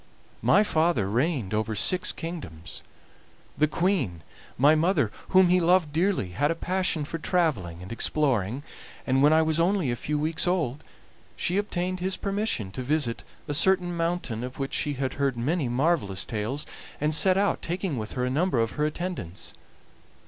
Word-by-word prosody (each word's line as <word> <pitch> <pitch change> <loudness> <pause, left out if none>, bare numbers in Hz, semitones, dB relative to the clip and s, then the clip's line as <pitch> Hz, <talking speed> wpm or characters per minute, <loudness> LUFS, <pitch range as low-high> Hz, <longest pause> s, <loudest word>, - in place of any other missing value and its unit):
My 205 - +5
father 160 - +1
reigned 120 - -1
over 110 0 -1
six 180 - +3
kingdoms. 150 - -8 0.7
The 155 - +3
Queen, 150 - -1 0.3
my 145 +4 +6
mother, 170 +5 +2 0.2
whom 185 -1 +5
he 180 +1 +4
loved 170 -3 +3
dearly, 175 - +1
had 140 +12 0
a 165 - 0
passion 180 -3 -1
for 165 +3 -5
traveling 110 - -1
and 95 - -10
exploring, 125 -2 0 0.4
and 130 0 +2
when 145 +2 +6
I 160 0 +5
was 160 0 +1
only 175 -5 +2
a - - -1
few 150 +5 -3
weeks 160 +4 -1
old 155 -7 -1 0.5
she 180 - -1
obtained 185 -2 -2
his 185 +1 -1
permission 200 - -2
to 130 - -5
visit 130 -3 -1 0.3
a 145 - -2
certain 175 +2 +2
mountain 165 -9 -2
of 125 +1 -7
which 135 -1 -4
she 145 - 0
had 130 0 -2
heard 135 -3 +1
many 140 +3 0
marvelous 120 - 0
tales, 115 +7 -3 0.3
and 150 +1 0
set 185 +4 +5
out, 200 0 +1
taking 175 -2 -2
with 110 -3 -5
her 125 -1 -1
a - - -1
number 155 -1 +1
of 115 -1 +1
her 150 0 0
attendants. 155 - -5
150 Hz, 170 wpm, -26 LUFS, 125-175 Hz, 0.7 s, my